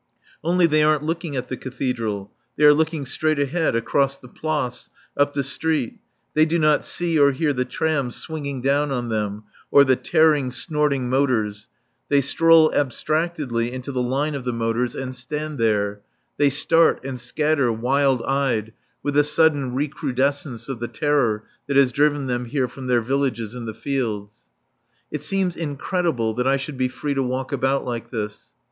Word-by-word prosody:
Only 175 +2 +3
they 155 -2 +3
aren't 150 -1 +3
looking 165 -1 -3
at 125 - -3
the 130 - -4
Cathedral. 120 -6 -3 0.3
They 150 - +1
are 150 0 +9
looking 160 -1 0
straight 155 +4 0
ahead, 145 +1 0
across 135 +4 +1
the 125 - -14
Place, 150 -3 -3 0.3
up 145 0 +1
the 140 - 0
street; 140 -1 -1 0.3
they 155 - +4
do 160 +2 +1
not 155 -2 +3
see 170 -3 0
or 140 -1 +5
hear 150 +1 0
the 125 -1 -1
trams 140 -6 -1
swinging 140 -5 -5
down 145 +2 +2
on 120 -3 -2
them, 105 -1 -2 0.3
or 140 - +7
the 130 -1 +4
tearing, 155 -3 +3
snorting 145 -1 -1
motors; 120 -6 0 0.4
they 145 - +4
stroll 160 +3 +4
abstractedly 145 -3 -1
into 130 +2 -6
the 130 -2 -1
line 135 +5 0
of 140 -3 -4
the 125 - -1
motors 115 +1 -1
and 130 -1 -5
stand 150 +4 -4
there; 105 -2 +1 0.4
they 145 -1 +4
start 165 +4 +3
and 130 -2 -5
scatter, 140 +1 +1
wild 130 +2 +1
eyed, 125 -6 0 0.3
with 145 -1 -2
a 145 - +6
sudden 145 -4 +2
recrudescence 140 -2 -1
of 135 -4 -5
the 120 - -3
terror 140 -9 +1 0.2
that 140 -1 +1
has 135 -2 +5
driven 145 +1 +2
them 125 -1 -2
here 130 +1 -1
from 130 +2 -9
their 125 -2 +3
villages 125 -3 -1
in 125 -1 -6
the 110 - -5
fields. 110 -7 -3 0.8
It 150 - -3
seems 185 +2 -1
incredible 150 -5 -1
that 125 +3 -1
I 135 +1 +3
should 135 0 -6
be 130 - +2
free 130 +3 -3
to 135 - 0
walk 130 0 -2
about 135 +1 0
like 120 -1 -4
this. 105 -3 -5
135 Hz, 175 wpm, -22 LUFS, 125-150 Hz, 0.8 s, are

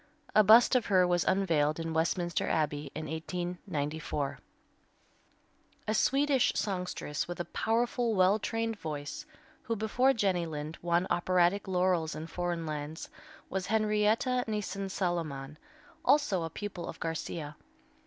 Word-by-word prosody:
A 215 - +7
bust 225 +4 +7
of 250 - +2
her 185 -2 +5
was 175 -1 +2
unveiled 165 -6 +2
in 165 0 -3
Westminster 170 +1 0
Abbey 150 -2 -1
in 155 - -4
1894. 160 -3 -3 1.5
A 215 - +1
Swedish 275 +3 +3
songstress 180 -7 -2
with 175 0 -6
a 175 - -2
powerful, 235 0 0
well 190 +3 +4
trained 225 0 -2
voice, 145 -2 -5 0.3
who 230 - -2
before 225 +5 +2
Jenny 190 -7 +1
Lind 155 0 -6
won 175 +1 +1
operatic 180 +2 +2
laurels 180 -3 +1
in 155 - -5
foreign 175 0 -3
lands, 150 0 -5 0.4
was 190 -1 -3
Henrietta 220 +3 +2
Nissen 200 -2 -3
Saloman, 155 -7 -3 0.5
also 280 - +3
a 165 - -3
pupil 185 0 -6
of - - -8
Garcia. 160 -2 -4
180 Hz, 130 wpm, -30 LUFS, 160-210 Hz, 1.5 s, A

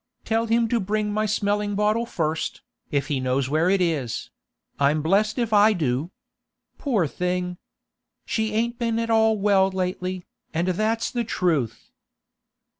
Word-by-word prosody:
Tell 225 +1 +1
him 230 +1 +2
to 235 - +2
bring 210 +1 -1
my 215 +1 0
smelling 205 0 0
bottle 215 +3 +1
first, 160 -4 -2 0.3
if 140 -2 0
he 145 -3 -1
knows 130 +1 0
where 160 +4 +2
it 195 0 +3
is—I'm 145 0 -2
blest 205 +7 +2
if 235 -3 -1
I 210 +1 +6
do! 150 -3 -1 0.7
Poor 230 - +1
thing! 180 +3 -2 0.7
She 220 -1 -1
ain't 235 +3 -1
been 230 -1 0
at 230 0 -1
all 220 -1 +4
well 195 -1 +3
lately, 185 -1 -3 0.3
and 170 +3 +1
that's 215 +5 0
the 240 -1 -1
truth. 165 - -1
195 Hz, 145 wpm, -24 LUFS, 165-220 Hz, 0.7 s, I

